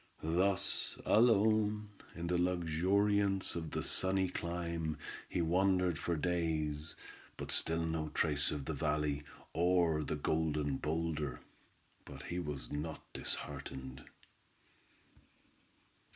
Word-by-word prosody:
Thus 95 +2 +2
alone 110 -2 +4 0.3
in 85 - -4
the 90 +1 +1
luxuriance 95 +3 +2
of 80 -2 -3
that - - -2
sunny 95 0 +3
clime 85 -2 -3 0.3
he 85 - 0
wandered 90 -1 +2
for 85 - -1
days, 80 -2 -1 0.4
but - - -4
still 80 0 +2
no 80 -1 -2
trace 75 -2 +1
of 70 -2 -3
the 80 - -2
valley, 75 0 0 0.3
or 85 -2 +3
the 75 - -2
Golden 75 -2 0
Boulder; 75 -4 -2 0.6
but 70 0 -10
he 85 - -3
was 75 -7 -5
not 75 +2 -4
disheartened. 65 -2 -4
80 Hz, 110 wpm, -35 LUFS, 75-90 Hz, 0.6 s, alone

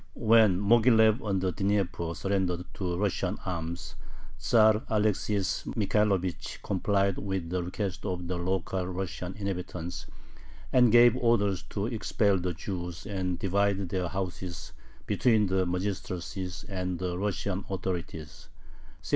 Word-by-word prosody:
When 110 -4 +5
Moghilev 110 +2 +5
on 100 -3 -1
the 95 -1 +1
Dnieper 95 -3 -1
surrendered 90 -2 -1
to 90 -3 -2
Russian 100 0 -1
arms, 85 -1 -4 0.5
Tzar 110 -1 +4
Alexis 105 -2 0
Michaelovich 100 -4 0
complied 100 0 +1
with 95 -4 -3
the 90 0 0
request 90 +1 -4
of 90 -2 -3
the 90 - -2
local 95 +1 -1
Russian 95 0 -4
inhabitants, 90 -3 -5 0.7
and 125 -3 +6
gave 120 0 +7
orders 105 -6 +2
to 100 -1 -2
expel 105 -4 +1
the 90 -1 -2
Jews 90 -1 -5
and 95 -3 -2
divide 100 0 +1
their 90 -1 -1
houses 90 -1 -5 0.3
between 110 -4 +3
the 95 -1 +1
magistracy 90 0 -3 0.2
and 90 -2 -3
the 90 0 -2
Russian 100 0 -1
authorities 85 -6 -5 0.6
(1654). - - -7
95 Hz, 125 wpm, -29 LUFS, 90-105 Hz, 0.7 s, gave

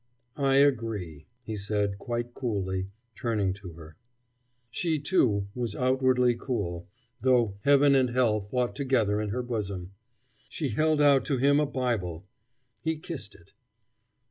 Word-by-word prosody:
"I 135 -2 +2
agree," 110 - +1 0.2
he 110 -2 -5
said 100 -1 -1
quite 120 -1 -4
coolly, 95 -7 -2 0.3
turning 105 -4 -1
to 95 -3 -10
her. 80 -1 -13 0.7
She, 160 +3 0
too, 130 - +2
was 120 -4 -3
outwardly 130 -1 +3
cool, 100 -8 -4 0.3
though 120 -6 +2
heaven 140 0 +6
and 130 -2 +3
hell 120 -4 +2
fought 120 +5 -2
together 115 -7 +1
in 105 - -3
her 125 +4 -2
bosom. 100 -6 -4 0.6
She 150 -4 -3
held 155 +6 +2
out 140 -2 +5
to 140 - 0
him 140 +3 +4
a 150 - +1
Bible. 110 - -2 0.6
He 160 +4 -1
kissed 140 - -8
it. 85 - -21
120 Hz, 140 wpm, -28 LUFS, 100-135 Hz, 0.7 s, heaven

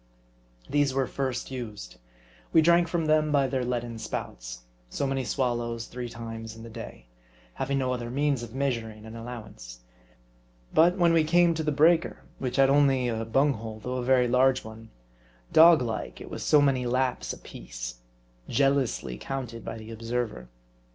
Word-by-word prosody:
These 145 -2 +1
were 135 -1 +2
first 130 -1 -3
used. 105 - -7 0.5
We 160 - +5
drank 170 +1 +5
from 165 -1 -1
them 155 0 +3
by 140 -2 +3
their 130 -1 -1
leaden 120 -2 -3
spouts; - - -6 0.3
so 140 - -2
many 135 -1 -1
swallows 120 -1 -1
three 125 -1 -6
times 115 -1 -7
in 115 - -11
the 115 - -10
day; - - -9 0.5
having 135 - -1
no 130 -1 0
other 120 -1 -4
means 140 0 0
of 120 - -7
measur 120 -3 -2
ing 110 - -13
an 110 +1 -9
allowance. 105 - -9 0.9
But 175 +3 +5
when 170 -2 +4
we 165 -1 +4
came 175 +2 +4
to 160 - -2
the 155 -1 0
breaker, 160 +3 +3 0.2
which 125 -2 -3
had 135 -1 +5
only 135 -3 +3
a 115 -1 -2
bung 135 +6 +3
hole, 110 -2 -7
though 125 +3 -4
a 125 - -2
very 125 -1 +4
large 130 +1 +3
'one, 110 0 -11 0.6
dog 160 -3 +8
like, 115 -2 -4
it - - -10
was - - -5
so 150 - +5
many 130 -3 +2
laps 125 - 0
apiece; - - -8 0.5
jealously 135 - +1
counted 125 -4 -5
by 115 - -6
the 110 0 -10
observer. 115 - -4
125 Hz, 170 wpm, -27 LUFS, 115-140 Hz, 0.9 s, dog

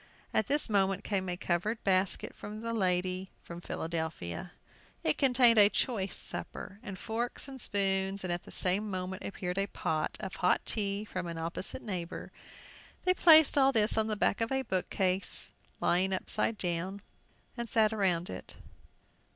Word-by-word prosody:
At 220 - +2
this 290 +1 +5
moment 195 -2 +1
came 190 -3 -1
a 175 - -3
covered 190 +7 -1
basket 190 -1 +1
from 215 +1 -8
the 230 0 -3
lady 185 -2 0
from 170 0 -9
Philadelphia. 160 - -4 0.5
It 155 - +2
contained 245 -4 +6
a 205 0 +9
choice 200 -3 -1
supper, 200 - -4
and 195 -2 -7
forks 235 +6 -3
and 265 -2 -8
spoons, 195 -1 0
and 180 -1 -1
at 175 - -3
the - - -15
same 195 +4 +1
moment 185 0 -4
appeared 180 -1 -3
a 195 - +1
pot 155 -5 -2
of 190 - -6
hot 180 - +2
tea 200 -1 -2
from 185 -3 -5
an 170 -1 -5
opposite 165 +4 -4
neighbor. 180 -6 -5 0.7
They 365 - +3
placed 315 -5 +7
all 270 0 +5
this 220 -4 +3
on 220 0 +1
the 215 - -1
back 205 - +1
of 225 - 0
a 265 0 0
bookcase 185 -2 -1 0.3
lying 185 +2 +2
upset, 205 +3 -1
and 175 +3 -2 0.7
sat 220 0 +2
around 185 -5 +1
it. - - -8
195 Hz, 160 wpm, -31 LUFS, 180-220 Hz, 0.7 s, a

